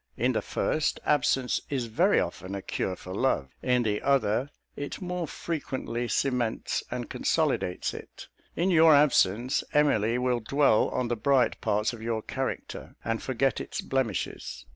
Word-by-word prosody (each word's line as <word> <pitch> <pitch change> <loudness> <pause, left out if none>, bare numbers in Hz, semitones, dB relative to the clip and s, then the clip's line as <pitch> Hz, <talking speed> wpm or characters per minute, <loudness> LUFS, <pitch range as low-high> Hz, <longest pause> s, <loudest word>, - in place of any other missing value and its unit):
In - - +2
the - - 0
first, 155 -1 -1
absence 130 -3 +2
is 130 -4 -1
very 170 - +3
often 90 +3 -4
a 100 - -5
cure 95 - -2
for 90 +1 -9
love. 95 - 0
In 125 -1 +2
the 105 -2 -1
other, 130 -1 +1 0.3
it 145 - -5
more 180 -2 -3
frequently 130 -8 -4
cements 125 -3 -1
and - - -4
consolidates 90 - 0
it. - - -10 0.3
In 180 +3 +1
your 160 -2 +7
absence, 125 -4 +3
Emily 120 -6 +3
will 125 -1 +1
dwell 135 0 +3
on 125 -1 -1
the 120 - 0
bright 130 +3 +2
parts 105 +1 0
of 115 - -9
your 110 -1 -2
character, - - -5
and 115 0 -1
forget 135 +1 0
its - - -5
blemishes. 110 - -3
125 Hz, 155 wpm, -28 LUFS, 110-140 Hz, 0.3 s, your